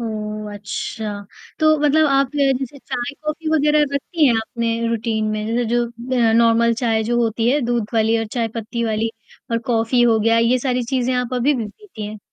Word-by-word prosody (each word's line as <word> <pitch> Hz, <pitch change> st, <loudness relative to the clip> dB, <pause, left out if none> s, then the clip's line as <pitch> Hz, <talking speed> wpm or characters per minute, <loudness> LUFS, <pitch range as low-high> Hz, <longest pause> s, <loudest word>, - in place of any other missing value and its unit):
ओह! 215 Hz, -2 st, -5 dB
अच्छा। 205 Hz, 0 st, -5 dB, 0.3 s
तो 310 Hz, -1 st, +4 dB
मतलब 300 Hz, +1 st, +4 dB
आप 275 Hz, -1 st, +2 dB
ज -, -, -1 dB, 0.2 s
जैसे 270 Hz, +1 st, -6 dB
चाय-कॉफी 300 Hz, +6 st, -4 dB
वगैरह 300 Hz, 0 st, +3 dB
रखती 300 Hz, +3 st, +1 dB
हैं 245 Hz, -, +4 dB
आपने 230 Hz, +1 st, -2 dB, 0.2 s
रूटीन 225 Hz, -1 st, -1 dB
में? 215 Hz, 0 st, -3 dB
जैसे 235 Hz, +2 st, 0 dB
जो 240 Hz, 0 st, +2 dB
अ, 235 Hz, 0 st, 0 dB
नॉर्मल 230 Hz, 0 st, +4 dB
चाय 225 Hz, -2 st, +2 dB
जो 240 Hz, +2 st, 0 dB
होती 225 Hz, 0 st, 0 dB
है, 290 Hz, +3 st, +2 dB
दूध 240 Hz, -3 st, -1 dB
वाली 225 Hz, 0 st, +3 dB
और 225 Hz, -, -2 dB
चाय 230 Hz, -1 st, +1 dB
पत्ती 235 Hz, +1 st, -3 dB
वाली 220 Hz, 0 st, -1 dB, 0.4 s
और 230 Hz, -, +1 dB
कॉफी 230 Hz, +2 st, +2 dB
हो 230 Hz, -2 st, +4 dB
गया 230 Hz, +1 st, +3 dB
ये 235 Hz, +2 st, +3 dB
सारी 250 Hz, -1 st, -1 dB
चीज़ें 255 Hz, 0 st, +1 dB
आप 250 Hz, 0 st, -1 dB
अभी 255 Hz, +4 st, +2 dB
भी 235 Hz, -4 st, -2 dB
पीती 220 Hz, -, -9 dB
हैं? 215 Hz, +1 st, -8 dB
235 Hz, 195 wpm, -20 LUFS, 225-260 Hz, 0.4 s, तो